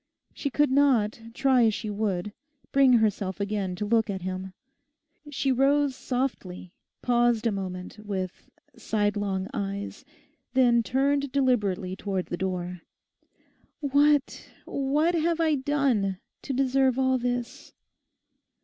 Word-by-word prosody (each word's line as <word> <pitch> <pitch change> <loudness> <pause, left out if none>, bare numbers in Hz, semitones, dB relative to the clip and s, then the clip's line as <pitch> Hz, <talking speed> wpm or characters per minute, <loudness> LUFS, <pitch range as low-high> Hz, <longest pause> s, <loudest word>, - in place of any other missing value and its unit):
She 285 - -3
could 295 +1 +2
not, 250 -6 +3
try 260 -3 +4
as 220 -2 +2
she 215 - -4
would, 205 -2 -2 0.4
bring 270 -2 +5
herself 205 -4 +1
again 200 -2 -2
to 210 - -3
look 225 +1 +2
at 190 -2 -4
him. 185 0 -5 0.8
She 275 -1 0
rose 275 +1 +2
softly, 220 -10 -4 0.3
paused 240 -2 +2
a 230 - +3
moment 185 0 -6
with 190 -3 -5 0.3
sidelong 205 -3 -1
eyes, 200 -3 -4 0.5
then 240 -2 +5
turned 275 +3 0
deliberately 210 -9 0
towards 190 -2 -3
the - - 0
door, 180 -1 -3 1.0
'What, 290 0 +2 0.2
what 295 +5 +1
have 335 0 +1
I 320 -2 +3
done 265 -9 +1 0.2
to - - -5
deserve 265 -1 +2
all 260 -1 +2
this? 245 +3 -4
235 Hz, 120 wpm, -26 LUFS, 195-270 Hz, 1.0 s, bring